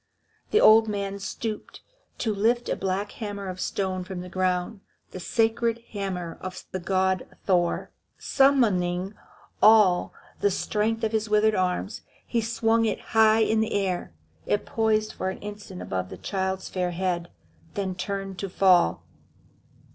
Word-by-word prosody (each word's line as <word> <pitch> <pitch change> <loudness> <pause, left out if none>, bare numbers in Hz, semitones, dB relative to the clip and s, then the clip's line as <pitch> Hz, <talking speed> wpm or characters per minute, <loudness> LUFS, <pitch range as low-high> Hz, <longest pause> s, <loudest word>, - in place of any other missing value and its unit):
The 430 - +4
old 220 - +7
man 200 -1 -3
stooped 215 +2 -5 0.4
to 220 -3 -1
lift 230 +4 +1
a - - +1
black 195 +2 -2
hammer 205 -3 -6
of 185 0 -6
stone 185 -2 -2
from 185 -1 -6
the 180 - -8
ground, 185 +3 -1 0.3
the 185 - -7
sacred 230 +3 0
hammer 185 -5 -4
of 185 0 -6
the 185 - -3
god 190 0 0 0.2
Thor. 175 -3 +1 0.3
Summoning 195 -9 +2 0.5
all 210 -5 +6 0.3
the 205 - +3
strength 220 +3 -1
of 220 - +1
his 220 -1 -1
withered 215 +1 +4
arms, 185 +2 -1 0.2
he 235 - 0
swung 225 0 +1
it 220 - -1
high 220 0 +5
in 220 0 +2
the 220 - 0
air. 190 - -1 0.4
It 205 - 0
poised 215 -1 +1
for 190 - -2
an 190 - -5
instant 205 -2 -8
above 90 -1 -3
the - - -8
child's 190 -1 -2
fair 180 -1 -1
head 175 -1 -2 0.5
then 195 -2 -2
turned 195 +1 -4
to 195 - -3
fall. 180 - +3
200 Hz, 150 wpm, -26 LUFS, 185-220 Hz, 0.5 s, old